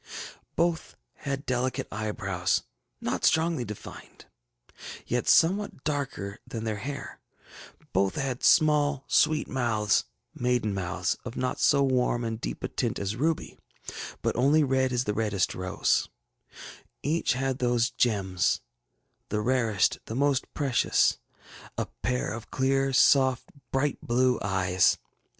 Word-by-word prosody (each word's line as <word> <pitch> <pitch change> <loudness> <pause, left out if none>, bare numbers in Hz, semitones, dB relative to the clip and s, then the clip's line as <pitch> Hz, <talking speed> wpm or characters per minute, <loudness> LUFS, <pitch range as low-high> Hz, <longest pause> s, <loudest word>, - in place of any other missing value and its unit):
Both 170 -1 0 0.2
had 140 0 -5
delicate 125 0 -1
eyebrows, 100 -4 -1 0.4
not - - -2
strongly 160 -4 +2
defined, 105 -2 -10 0.8
yet 125 0 -1
somewhat 185 -3 +3
darker 135 -9 -3
than 115 -3 -5
their 110 -2 -2
hair; 140 +7 -6 0.7
both 95 0 +2
had 135 -3 -2
small 150 -3 +4
sweet 155 -1 +2
mouths, 110 -5 +1 0.3
maiden 125 -4 0
mouths, 90 -1 -1
of 125 0 -7
not 125 0 -2
so 140 -1 +4
warns 125 -2 +1
and 115 0 -4
deep - - -5
a - - 0
tint - - -2
as 100 +1 -2
ruby, 160 +6 -1 0.6
but - - 0
only 140 +5 +4
red 130 -1 +1
as 125 0 +1
the 105 - -1
reddest 105 -4 0
rose; 90 0 0 0.9
each 155 +1 +1
had 135 +1 -2
those 120 0 +2
gems, 95 - +1 0.7
the 105 - -1
rarest, 115 -4 +1
the 110 - -6
most 140 0 +1
precious, 135 -5 +2 0.6
a - - 0 0.2
pair 125 -2 -1
of 115 0 -8
clear, 135 +1 +1
soft 130 -1 +4 0.2
bright 135 +1 0
blue 125 +1 +2
eyes. 95 -2 +2
125 Hz, 130 wpm, -27 LUFS, 105-135 Hz, 0.9 s, small